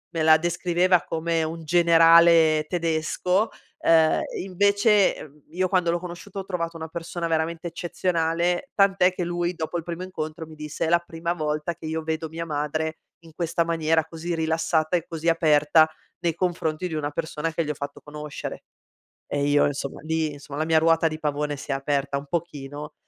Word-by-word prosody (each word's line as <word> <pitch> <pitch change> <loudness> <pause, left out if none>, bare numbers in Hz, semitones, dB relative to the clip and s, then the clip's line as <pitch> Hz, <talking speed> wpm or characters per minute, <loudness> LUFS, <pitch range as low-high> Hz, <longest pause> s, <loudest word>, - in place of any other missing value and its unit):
me 160 - +1
la 160 0 +7
descriveva 175 +1 +2
come 165 0 -1
un 165 +1 -5
generale 165 -1 +6
tedesco, 175 +4 0 0.3
ehm, 160 -1 +4 0.2
invece, 200 +2 +3
mhmm, 150 0 -16
io 185 +3 0
quando 180 -2 +2
l'ho 175 - 0
conosciuta 180 +3 -8
ho 190 - -6
trovato 170 -3 -3
una 160 0 -6
persona 170 +1 -4
veramente 165 +1 -1
eccezionale; 170 - -1
tant'è 195 -2 +4
che 185 - -3
lui, 175 0 -1
dopo 165 0 -4
il 170 - -4
primo 170 +1 -5
incontro 160 -3 -5
mi 155 - -12
disse: 150 +1 -4
"È - - 0
la 175 - +5
prima 170 0 -4
volta 155 0 -2
che 160 - -11
io 160 +1 -2
vedo 160 0 -3
mia 165 +1 -5
madre 155 +1 -2 0.3
in 165 - -15
questa 170 0 0
maniera, 165 -1 +1
così 165 +1 -4
rilassata 160 +1 +1
e 170 - -5
così 165 0 -1
aperta, 155 -1 +4 0.3
nei 170 -2 -1
confronti 175 -1 -1
di - - -6
una 150 -1 -2
persona 160 +1 -3
che 165 0 -1
gli - - -5
ho 150 - 0
fatto 140 0 -7
conoscere." 150 0 -7 0.6
E 145 0 -1
io 145 0 +4
insomma 140 -1 -5
lì 160 0 -1
insomma 140 0 -9
la 155 - 0
mia 160 0 +4
ruota 165 0 +3
di 155 0 -4
pavone 150 -1 -1
si 140 - -10
è - - +2
aperta 140 0 -1
un 140 - -6
pochino 150 -2 -5
165 Hz, 185 wpm, -24 LUFS, 155-175 Hz, 0.6 s, la